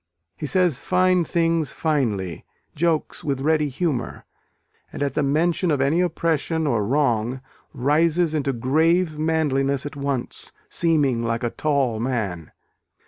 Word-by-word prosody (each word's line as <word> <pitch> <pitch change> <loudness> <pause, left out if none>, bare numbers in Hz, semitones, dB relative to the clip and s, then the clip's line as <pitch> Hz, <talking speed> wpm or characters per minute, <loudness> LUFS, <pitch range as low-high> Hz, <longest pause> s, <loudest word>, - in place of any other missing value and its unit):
He 150 - -5
says 175 -5 +2
fine 185 0 +2
things 165 -3 +1
finely, 110 - -1 0.3
jokes 165 0 -1
with 135 -3 -2
ready 150 0 +2
humour, 135 -3 -3 0.7
and - - -3
at 140 -2 -1
the 150 - 0
mention 165 +5 +1
of 145 -3 +1
any 140 +6 +2
oppression 165 -2 0
or 115 -7 +1
wrong 125 -1 0 0.3
rises 160 +5 +2
"into 145 -3 0
grave 155 +6 +1
manliness 140 -4 +1
at 145 - -6
once, 140 -3 -3 0.2
seeming 145 -8 +1
like 115 0 -2
a 120 - -1
tall 140 -7 0
man." 105 - -3
145 Hz, 135 wpm, -23 LUFS, 130-165 Hz, 0.7 s, says